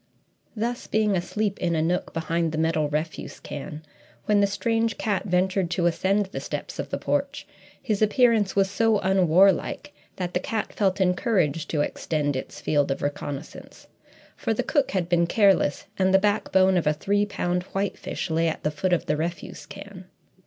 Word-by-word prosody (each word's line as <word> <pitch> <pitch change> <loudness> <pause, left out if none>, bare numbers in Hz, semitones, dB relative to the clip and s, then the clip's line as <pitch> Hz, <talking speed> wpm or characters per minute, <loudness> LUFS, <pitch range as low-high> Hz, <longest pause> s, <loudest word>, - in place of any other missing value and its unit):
Thus, 235 +2 -3
being 215 -2 +2
asleep 200 +3 -2
in 170 -2 0
a 155 - +1
nook 175 +2 -1
behind 165 0 -1
the - - -2
metal 160 -2 +1
refuse 155 +2 -4
can, 150 +2 -7 0.4
when 210 -1 +3
the 200 - +4
strange 225 +3 0
cat 205 -3 -1
ventured 185 -1 +1
to 170 0 0
ascend 195 +4 +2
the - - -4
steps - - -6
of - - -3
the - - -2
porch, - - -2 0.3
his 215 -4 -2
appearance 215 -2 +3
was 195 -1 +3
so 220 +2 +2
unwarlike 190 - +3 0.2
that 180 -1 -4
the - - +1
cat 220 +3 -3
felt 195 -2 +1
encouraged 180 - +1
to 150 - 0
extend 145 -1 -1
its 130 - -6
field 145 -2 +1
of 135 - -2
reconnaissance 145 0 -6 0.5
for - - -1
the - - 0
cook 285 -4 +1
had 185 -3 -1
been 170 -1 +2
careless, 195 -7 +3
and 190 0 +3
the 190 - +7
backbone 190 -2 +3
of 165 - 0
a 150 - +4
three 205 +6 0
pound 180 -3 -1
whitefish 195 -2 -3
lay 165 +1 +2
at 160 - -3
the 150 - 0
foot 180 +5 -1
of 175 - +1
the - - 0
refuse 170 +3 -5
can. 200 -2 -10
185 Hz, 180 wpm, -25 LUFS, 165-205 Hz, 0.5 s, the